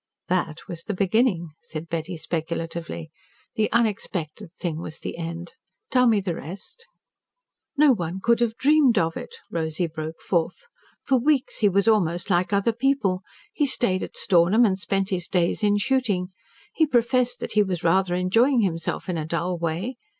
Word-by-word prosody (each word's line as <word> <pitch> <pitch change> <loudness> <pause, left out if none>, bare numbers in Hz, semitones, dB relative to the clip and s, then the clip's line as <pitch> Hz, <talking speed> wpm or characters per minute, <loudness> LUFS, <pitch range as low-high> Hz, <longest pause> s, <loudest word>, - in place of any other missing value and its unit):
"That 170 -3 -1
was 170 -2 -7
the 210 - -3
beginning," 195 -3 +1
said 160 +1 -8
Betty 165 +1 -4
speculatively. 165 0 -4 0.4
"The 215 -1 0
unexpected 200 -5 -1
thing 165 -3 -3
was 160 -1 -7
the - - -5
end. 170 +1 -6 0.4
Tell 250 -1 +4
me 220 -3 +4
the 190 -3 -2
rest?" 200 - -9 0.9
"No 295 -1 +6
one 180 -3 -3
could 230 +4 +2
have 230 -2 0
dreamed 285 -4 +4
of 165 -2 +1
it," 470 - -7 0.2
Rosy 160 +1 -1
broke 160 0 -6
forth. 180 - -1 0.4
"For 265 -2 +2
weeks 280 +1 +1
he 210 - +4
was 200 +2 +1
almost 175 -4 +2
like 180 +2 +2
other 200 +3 +2
people. 235 -7 +1 0.3
He 295 -9 +1
stayed 190 -8 +1
at - - -6
Stornham 190 +5 +4
and 190 -3 +1
spent 195 +2 -1
his 180 -2 -1
days 175 +2 +1
in 205 -1 +3
shooting. 205 -6 0 0.4
He 315 - +3
professed 245 -1 +2
that - - -5
he 215 - +4
was 190 -4 -2
rather 180 +1 +2
enjoying 230 +8 +3
himself 165 -5 -2
in 175 -3 -2
a 155 - -3
dull 170 +2 -1
way. 170 +10 -3
190 Hz, 170 wpm, -24 LUFS, 170-235 Hz, 0.9 s, No